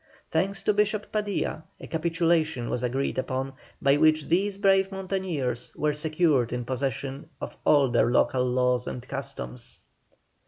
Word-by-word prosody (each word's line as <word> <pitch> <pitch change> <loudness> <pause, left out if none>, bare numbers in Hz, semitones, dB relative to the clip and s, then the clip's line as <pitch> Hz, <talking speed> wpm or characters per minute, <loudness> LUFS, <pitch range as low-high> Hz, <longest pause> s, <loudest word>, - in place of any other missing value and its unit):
Thanks 195 0 0
to 210 - +3
Bishop 210 0 0
Padilla, 205 -6 -1 0.2
a - - -8
capitulation 165 -5 0
was 120 - -1
agreed 130 +2 -1
upon, 130 +1 -2 0.3
by 140 +1 +4
which 155 0 +4
these 195 +4 +1
brave 195 -1 +3
mountaineers 185 -11 -2
were 150 0 +1
secured 150 -4 +1
in 125 -1 -3
possession 135 +3 -3
of - - -6
all 145 -2 +6
their 120 -1 +3
local 125 +1 +3
laws 125 0 +1
and 125 0 -6
customs. 135 -3 -6
150 Hz, 145 wpm, -27 LUFS, 130-185 Hz, 0.3 s, all